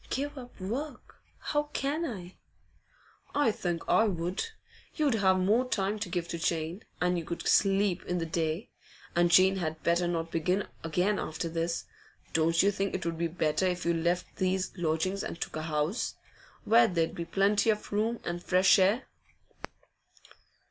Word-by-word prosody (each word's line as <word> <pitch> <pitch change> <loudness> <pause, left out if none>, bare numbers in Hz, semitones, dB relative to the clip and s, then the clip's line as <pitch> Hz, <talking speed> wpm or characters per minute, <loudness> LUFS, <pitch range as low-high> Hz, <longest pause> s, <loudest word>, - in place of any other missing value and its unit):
'Give 285 +3 -2
up 250 -5 -11
work? 250 +9 -5 0.2
How 295 0 -1
can 295 +5 -1
I?' 185 - -7 1.0
'I 285 -6 +4
think 175 -5 -3
I 220 - +4
would. 180 -2 -1 0.5
You'd 300 -5 +2
have 190 -4 +3
more 220 +7 +2
time 205 -1 0
to 205 -3 -3
give 175 -1 -2
to 170 - -4
Jane, 165 +3 -1 0.2
and 180 0 +1
you - - -5
could 170 +2 -5
sleep 195 -2 +3
in 180 - -1
the 165 - -1
day. 165 +3 -2 0.4
And 175 0 +4
Jane 190 +2 +6
had 160 -3 -3
better 170 +1 +2
not 165 -1 -2
begin 180 +5 0 0.2
again 180 +6 +1
after 160 +2 -3
this. 165 +1 -2 0.5
Don't 165 +1 +3
you 200 - +4
think 195 0 -2
it 185 - -4
would 165 -1 -2
be 170 - +1
better 165 +1 0
if 180 -1 -2
you 170 - +3
left 170 +2 -1
these 190 0 0
lodgings 175 +3 -1
and - - -5
took - - -4
a 155 - -2
house, 155 +5 -1 0.5
where 230 +2 +6
there'd 165 -4 0
be 170 - -4
plenty 200 +4 +2
of 210 -1 0
room 225 +3 0
and 175 0 -3
fresh 185 +2 +5
air? 200 +7 +3
185 Hz, 170 wpm, -30 LUFS, 170-205 Hz, 1.0 s, Jane